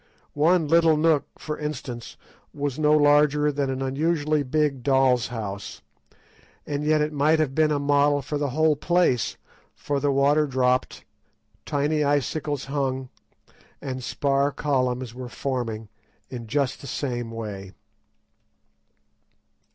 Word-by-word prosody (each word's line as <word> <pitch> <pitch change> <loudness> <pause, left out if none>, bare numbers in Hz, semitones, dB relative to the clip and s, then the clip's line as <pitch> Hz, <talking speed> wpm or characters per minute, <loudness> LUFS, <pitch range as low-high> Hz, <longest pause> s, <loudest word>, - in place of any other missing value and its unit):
One 160 +2 +3
little 165 0 +4
nook, 155 -2 +2
for 150 -1 -5
instance, 130 -6 -6 0.4
was 145 -1 -3
no 150 -1 +3
larger 150 0 +4
than 140 -1 -1
an 135 0 -2
unusually 150 +2 0
big 145 -1 0
doll's 130 -3 +3
house, 100 -4 -6 0.8
and 145 0 -3
yet 155 0 +2
it 150 +1 -1
might 150 +2 +3
have 155 -4 0
been 155 +1 +3
a 150 - +1
model 145 0 +2
for 145 +3 -3
the 145 -1 -1
whole 155 +3 +2
place, 170 - +1 0.4
for 145 -1 -2
the 145 0 +1
water 145 +2 +3
dropped, 125 -1 0 0.6
tiny 150 +2 0
icicles 145 0 -1
hung, 135 -2 -2 0.7
and 130 -2 -5
spar 140 +2 0
columns 130 -4 -1
were 125 0 -7
forming 120 -5 -4 0.4
in 120 -3 -7
just 140 +2 -1
the 140 - -9
same 120 -3 -3
way. 105 -4 -7
140 Hz, 130 wpm, -24 LUFS, 130-150 Hz, 0.8 s, little